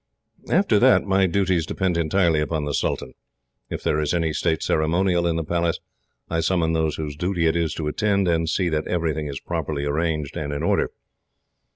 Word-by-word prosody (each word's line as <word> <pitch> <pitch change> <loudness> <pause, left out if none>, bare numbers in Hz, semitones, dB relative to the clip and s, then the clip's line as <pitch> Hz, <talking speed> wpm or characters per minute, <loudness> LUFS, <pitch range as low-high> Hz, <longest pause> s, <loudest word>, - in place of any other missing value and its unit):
"After - - +3
that, - - +5
my 95 -1 +2
duties 90 -3 +1
depend 95 -3 -1
entirely 85 0 +2
upon 75 0 -2
the 75 - -3
sultan. - - -2 0.6
If - - -5
there 75 - +1
is 75 +2 0
any 80 -2 0
state 80 -1 0
ceremonial 85 +2 +1
in 85 - 0
the 85 - -1
Palace, 85 +1 0 0.5
I 80 - -1
summon 80 -1 +1
those 80 -1 0
whose 75 -2 -5
duty 90 +1 -1
it 80 - +2
is 85 -2 0
to 80 - -3
attend, 100 +3 +1
and 80 -1 +1
see 90 +1 +1
that 75 -1 -1
everything 80 -3 -1
is 70 -1 -5
properly 75 -4 -3
arranged 75 -1 -1
and 75 -1 -3
in 70 - -3
order. - - +1
80 Hz, 190 wpm, -23 LUFS, 75-85 Hz, 0.6 s, that